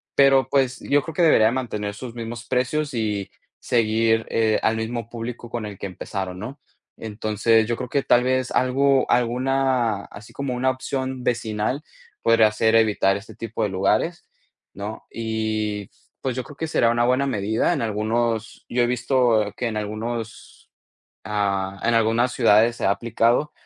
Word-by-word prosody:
Pero, 135 -2 +5
pues, 130 -2 +1
yo 145 0 +2
creo 160 - -7
que 175 - +1
debería 130 -9 +5
de 115 - +1
mantener 105 -5 -3
sus 120 +1 -8
mismos 120 0 -6
precios 135 +3 -1
y 105 -4 -2 0.3
seguir 115 -1 +2
eh 110 -1 +2
al 110 - +2
mismo 115 0 -4
público 120 0 -6
con 120 -2 -4
el 105 -2 -7
que 100 - -4
empezarón, 95 0 -5
¿no? 125 +8 -7 0.4
Entonces, 110 +1 +1
yo 120 - 0
creo 125 - -5
que 140 +1 0
tal 120 0 +4
vez 130 0 0
algo 135 +1 +2
alguna 125 -3 +1
así 105 +2 -12
como 140 -2 -3
una 130 +1 +1
opción 130 -1 -3
vecinal, 115 +4 -1 0.4
podría 115 -2 +4
ser 110 +1 +2
evitar 105 -3 +3
este 110 +2 -11
tipo 115 -1 -4
de 105 - 0
lugares, 105 - 0 0.5
¿no? 105 +2 -7
Y 110 -2 -3 0.3
pues, 130 -2 -2
yo 130 - -3
creo 145 -2 -13
que 160 - -3
será 115 -7 +2
una 120 0 +2
buena 130 +2 +2
medida 110 - 0
en 145 - -2
algunos, 110 +1 -1
yo 120 0 +1
he - - +2
visto 120 -4 +1
que 120 - -2
en 110 - -3
algunos 110 +2 -6 0.6
ah, 100 -2 -1
en 115 - +2
algunas 115 +2 +2
ciudades 115 0 +4
se - - -2
ha 100 - +4
aplicado 120 +6 +1
115 Hz, 170 wpm, -23 LUFS, 110-125 Hz, 0.6 s, Pero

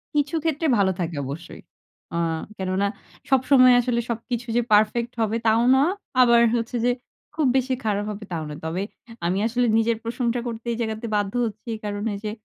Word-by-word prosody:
কিছু 290 +2 +1
ক্ষেত্রে 320 0 0
ভালো 190 -1 +3
থাকে 170 -2 -2
অবশ্যই। 150 +6 -8 0.5
আ - - 0 0.4
কেননা 190 +1 0 0.4
সবসময় 255 -1 +6
আসলে 235 -1 0
সবকিছু 235 +1 -3
যে 240 - +4
পারফেক্ট 220 +3 +3
হবে 220 +1 +1
তাও 225 +1 +4
না। - - +4 0.4
আবার 235 -1 +6
হচ্ছে 235 +1 -2
যে - - +4 0.5
খুব 310 -3 +1
বেশি 260 0 0
খারাপ 205 -1 0
হবে 210 +1 -7
তাও 160 -2 -2
না। 150 - -6
তবে 165 +4 -2 0.4
আমি 180 +3 +1
আসলে 245 +1 +1
নিজের 225 0 +2
প্রশংসা 240 +1 -1
করতে 230 0 -6
এই - - -4
জায়গাতে 220 0 -3
বাধ্য 205 0 0
হচ্ছি 220 +2 -7
কারণ 205 0 -3
এই - - -6
যে 210 - -1
225 Hz, 180 wpm, -24 LUFS, 205-245 Hz, 0.5 s, সবসময়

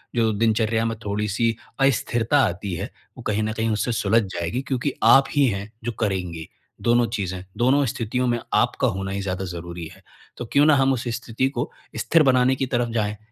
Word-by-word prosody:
जो 115 -2 +2
दिनचर्या 110 +1 +1
में 115 0 -1
थोड़ी 105 +1 -1
सी 115 +3 +1 0.2
अस्थिरता 135 0 +2
आती 90 +2 -3
है, - - -4 0.3
वो - - -8
कहीं 105 0 0
न 110 0 -1
कहीं 110 0 -1
उससे 110 +3 0
सुलझ 115 0 +2
जाएगी 85 +9 -2
क्योंकि 130 +1 -1
आप 135 +5 +7
ही 145 -2 +3
हैं 100 0 -3
जो 120 - -2
करेंगे। 90 -6 -2 0.3
दोनों 120 0 +3
चीज़ें, 95 -5 -4
दोनों 135 +4 +3
स्थितियों 120 +2 -1
में 120 -1 +1
आपका 125 +1 +2
होना 95 -2 -3
ही 100 0 -2
ज़्यादा 95 0 -3
ज़रूरी 85 -1 -6
है। - - -21 0.3
तो 120 - -5
क्यों 145 +1 +5
ना 155 -1 +6
हम 135 0 +3
उस 125 -1 -3
स्थिति 125 +2 -1
को - - -1 0.3
स्थिर 165 -1 +3
बनाने 130 -1 +4
की 135 - -1
तरफ 120 -2 -1
जाए, 105 -2 -1
115 Hz, 200 wpm, -23 LUFS, 100-125 Hz, 0.3 s, आप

